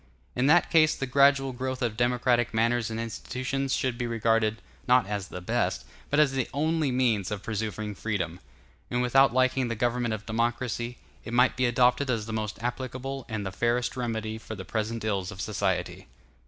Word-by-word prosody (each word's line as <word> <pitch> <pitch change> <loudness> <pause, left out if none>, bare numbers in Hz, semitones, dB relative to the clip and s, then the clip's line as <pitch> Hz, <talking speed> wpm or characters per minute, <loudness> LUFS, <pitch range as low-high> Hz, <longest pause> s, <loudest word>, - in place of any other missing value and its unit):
In 125 +2 +2
that 175 +4 +4
case, 155 -2 +5
the 135 - -3
gradual 140 0 +4
growth 130 +1 -3
of 115 -3 -1
democratic 120 0 +1
manners 115 +1 +2
and 110 0 -4
institutions 130 +4 -2
should 125 -2 -1
be 120 - -1
regarded, 115 -1 +1 0.3
not 125 -2 +5
as 100 -2 -3
the 90 - -7
best, 65 -7 -1 0.2
but 145 - +2
as 150 -3 +5
the 135 -2 -1
only 155 -1 +1
means 115 -7 +1
of 105 -2 -4
preserving 110 -1 -3
freedom; 95 -6 -3 0.5
and 125 0 0
without 135 +2 +5
liking 130 0 +2
the 115 - -2
government 120 0 0
of 110 0 -10
democracy, 120 +1 -2 0.3
it 115 - -7
might 125 +1 +4
be 125 0 +2
adopted 125 +3 +3
as 115 -4 0
the 110 - -6
most 110 -1 -3
applicable 130 +2 -4
and 105 -3 -3
the 95 - -3
fairest 120 +4 0
remedy 110 -3 -3
for 110 - -7
the 95 -2 -8
present 110 0 -3
ills 100 -4 -1
of 100 -3 -9
society. 105 - -2
120 Hz, 185 wpm, -27 LUFS, 110-130 Hz, 0.5 s, case